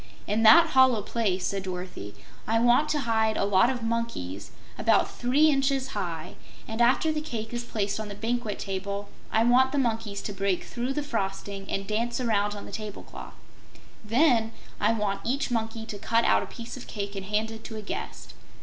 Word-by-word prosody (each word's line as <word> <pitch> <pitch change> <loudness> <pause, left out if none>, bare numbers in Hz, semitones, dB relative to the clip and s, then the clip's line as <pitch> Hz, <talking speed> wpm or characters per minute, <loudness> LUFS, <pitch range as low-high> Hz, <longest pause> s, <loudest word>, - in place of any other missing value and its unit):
"In 210 +2 0
that 325 +9 +8
hollow 260 -6 +5
place," 195 -5 -1
said 195 +1 -1
Dorothy, 180 - -6 0.3
"I 225 - +2
want 245 +6 +4
to 295 - +1
hide 220 -2 +1
a - - +1
lot 200 +3 +4
of 250 -3 -3
monkeys 225 - -3 0.3
about - - +2
three 285 +6 +4
inches 270 -1 +1
high, 175 -9 -4 0.3
and 225 +1 -2
after 255 +6 +4
the 305 0 -2
cake 230 -7 -5
is 240 0 -3
placed 205 -3 -2
on 215 - -4
the 205 - -7
banquet 225 0 -2
table, 200 +1 -4 0.2
I 220 - +3
want 255 +2 +4
the 290 - -1
monkeys 225 -5 -1
to 205 - -4
break 195 -2 0
through 245 +2 -3
the 295 +1 -2
frosting 195 -5 -4
and 195 - -2
dance 230 +4 -1
around 210 -4 +1
on 205 - -8
the - - -10
table 215 -2 -6
cloth. - - -10 0.7
Then, 230 -1 +3 0.3
I 210 +2 +3
want 205 -3 -1
each 270 +2 -1
monkey 225 -1 -2
to 210 -2 -7
cut 230 +3 +2
out - - +4
a - - -5
piece 235 0 -8
of 255 - -10
cake 200 -1 -5
and 195 -1 -5
hand 215 +2 0
it 225 0 -9
to 220 - -7
a 215 - -6
guest." - - -6
225 Hz, 200 wpm, -27 LUFS, 200-245 Hz, 0.7 s, that